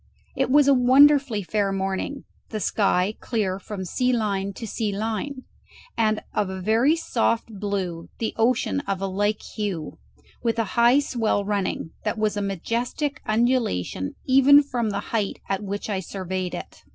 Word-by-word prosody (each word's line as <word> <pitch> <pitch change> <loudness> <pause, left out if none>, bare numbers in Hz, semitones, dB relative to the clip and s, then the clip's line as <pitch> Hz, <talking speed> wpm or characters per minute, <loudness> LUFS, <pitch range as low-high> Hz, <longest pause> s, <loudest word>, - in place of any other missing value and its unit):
It 265 -1 0
was 285 +1 +5
a 280 - +7
wonderfully 265 -2 +5
fair 200 +1 0
morning, 195 +8 -3 0.3
the 215 - -3
sky 195 -1 +1
clear 200 -5 -1
from 195 -1 -6
sea 250 +8 0
line 200 -4 0
to 225 - -7
sea 215 0 -2
line, 225 +6 -3 0.5
and 215 -1 +1
of 205 -3 0
a 190 0 -5
very 225 - +3
soft 230 -7 -1
blue, 190 -5 -3
the 225 - -2
ocean 250 +4 +1
of 195 -2 -1
a 195 - -2
like 205 +2 -1
hue, 190 - -4 0.4
with 230 -1 0
a 230 - +2
high 240 +2 +5
swell 225 -7 0
running, 200 -5 -2
that - - -1
was 215 -1 0
a 205 - -1
majestic 235 - -2
undulation 215 - 0
even 275 +2 +7
from 245 -5 -2
the 200 -1 -2
height 210 -3 -1
at 195 0 -1
which 205 0 -4
I 200 -3 -1
surveyed 185 0 -4
it. - - -9
215 Hz, 165 wpm, -24 LUFS, 195-245 Hz, 0.5 s, a